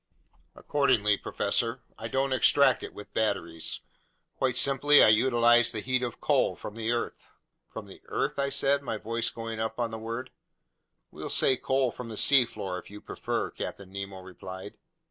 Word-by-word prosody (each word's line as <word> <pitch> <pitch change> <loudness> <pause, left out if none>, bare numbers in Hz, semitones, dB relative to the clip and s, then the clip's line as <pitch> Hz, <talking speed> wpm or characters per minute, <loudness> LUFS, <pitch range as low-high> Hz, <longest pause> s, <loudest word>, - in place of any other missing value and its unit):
"Accordingly, 110 -8 +2
professor, 115 +5 -1
I 115 - -6
don't 135 +3 0
extract 135 +2 +4
it - - -8
with 105 - -11
batteries; 85 -7 -2 0.5
quite 130 -2 0
simply, 140 +2 +5
I - - +7
utilize 120 +1 +4
the 110 - -3
heat 130 +3 0
of 120 -2 -4
coal - - +2
from 105 - -8
the 115 0 -2
earth." 120 0 -4 0.3
"From - - -8
the - - -14
earth?" - - -2
I 140 0 +1
said, 140 0 +1
my 115 -5 -3
voice 115 +2 -2
going 115 -1 -6
up 110 +2 -3
on 120 -1 -1
the 110 - -6
word. 115 +3 -5 0.8
"We'll - - -7
say 130 - +3
coal 130 0 0
from 120 0 -8
the 110 - -7
seafloor, 115 -9 +2
if - - -14
you 105 +1 -10
prefer," - - -3
Captain 95 -2 -7
Nemo 100 -1 -6
replied. 95 +1 -9
115 Hz, 170 wpm, -28 LUFS, 105-130 Hz, 0.8 s, I